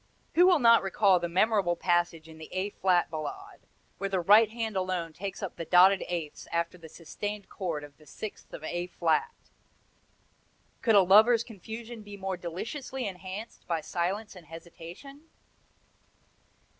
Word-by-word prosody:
Who 355 +2 +6
will 365 -2 +6
not 230 -4 +6
recall 195 -1 +3
the 175 0 -3
memorable 190 -1 +2
passage 175 -2 0
in 160 0 -13
the 155 - -10
A 190 +2 -2
flat 180 -3 +1
Ballade, 155 -2 -6 0.4
where 195 +1 -2
the 190 -1 0
right 210 +5 +6
hand 225 -2 -4
alone 185 -3 -2
takes 195 +3 -6
up 195 - -5
the - - -4
dotted 185 +3 +5
eighths 165 -4 -5
after 170 +1 -1
the 165 -2 -13
sustained 205 +6 -6
chord 165 -6 -4
of 145 -1 -13
the 155 - -19
sixth 215 - -8
of - - -9
A 175 +2 -3
flat? 180 - 0 1.5
Could 225 -3 +3
a 200 - +7
lover's 220 +5 +6
confusion 225 +2 -9
be 205 -1 -10
more 190 -1 -3
deliciously 230 - -5
enhanced 190 +3 -8
by 165 -2 -1
silence 190 +7 -3
and 175 -4 -13
hesitation?" 175 - -12
190 Hz, 155 wpm, -29 LUFS, 170-215 Hz, 1.5 s, a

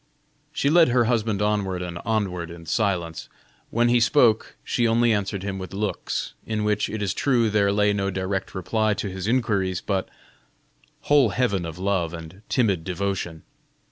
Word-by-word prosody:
She 140 - +1
led 170 0 +6
her 120 0 +3
husband 110 -3 0
onward 100 -4 0
and 85 -1 -5
onward 95 -7 -1
in 85 0 -10
silence; 85 -4 -1 0.4
when 120 +1 +2
he 120 0 +4
spoke, 115 -2 +3
she 120 -1 +1
only 115 0 +3
answered 100 -2 -2
him 95 -1 -3
with 95 0 -7
looks, 105 +1 -3
in 110 -1 -2
which, 105 0 +1
it 110 -1 -3
is 95 -3 0
true, 120 -4 +2
there 100 -1 +3
lay 105 0 +2
no 100 -1 -1
direct 95 +1 -3
reply 105 +4 0
to 100 - -4
his 95 +1 -5
inquiries, 100 -7 +1
but 95 -2 -2 0.9
whole 145 -5 +4
heaven 100 -6 0
of 80 +1 -7
love 90 -3 -1
and 85 +4 -10
timid 100 -9 +1
devotion. 90 -3 -3
100 Hz, 170 wpm, -24 LUFS, 95-110 Hz, 0.9 s, led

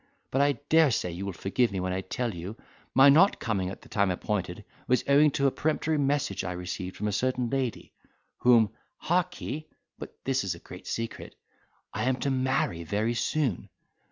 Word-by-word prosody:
But 135 - +2
I 145 0 +4
dare 160 -1 +5
say 90 -7 -1
you 95 +4 -5
will - - -2
forgive 100 +7 0
me 95 - -2
when 90 0 -2
I 95 - -1
tell 115 +5 -3
you, 90 +6 -7 0.4
my 135 +2 +8
not 165 +8 +6
coming 100 -5 -1
at 95 - -9
the - - -15
time 100 -2 +1
appointed 95 +1 -3 0.2
was 125 - +2
owing 145 +2 +6
to 140 - +1
a 135 - +4
peremptory 155 +1 0
message 145 +1 0
I 90 -1 -3
received 90 +1 -5
from 105 - -2
a - - 0
certain 125 +3 0
lady, 130 -4 -2 0.5
whom, 115 -4 +5 0.3
harkee! 175 -3 -2 0.3
(but - - -9
this - - 0
is - - -2
a - - -12
great - - -12
secret) 115 0 -5 0.6
I - - -2
am 130 0 +2
to 140 - 0
marry 130 -10 0
very 105 +7 0
soon. 130 - -1
120 Hz, 190 wpm, -28 LUFS, 95-140 Hz, 0.6 s, my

